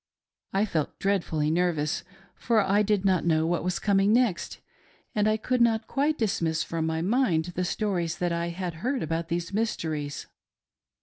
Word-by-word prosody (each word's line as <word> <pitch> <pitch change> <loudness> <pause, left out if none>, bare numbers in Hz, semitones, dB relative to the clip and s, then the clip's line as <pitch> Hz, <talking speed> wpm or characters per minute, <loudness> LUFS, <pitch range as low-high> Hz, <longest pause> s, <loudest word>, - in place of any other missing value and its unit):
I 195 +2 +2
felt 160 -8 -2
dreadfully 170 -6 0
nervous, 165 -1 0 0.3
for 230 -2 +1
I 200 +1 +3
did 210 -2 +1
not 185 -3 +3
know 160 -1 +2
what 170 0 0
was 180 0 -1
coming 200 0 +2
next, 230 -6 +1 0.6
and 210 0 +2
I 215 0 +2
could 250 +3 0
not 225 -1 +3
quite 295 +5 0
dismiss 165 -7 0
from 165 -1 -2
my 160 0 -1
mind 195 -6 +2
the 180 - -1
stories 180 -3 -1
that 175 -1 -1
I 170 0 -1
had 170 -1 -4
heard 255 +3 -1
about 165 +1 -2
these 170 +2 -3
mysteries. 160 -9 -2
180 Hz, 170 wpm, -27 LUFS, 165-215 Hz, 0.6 s, I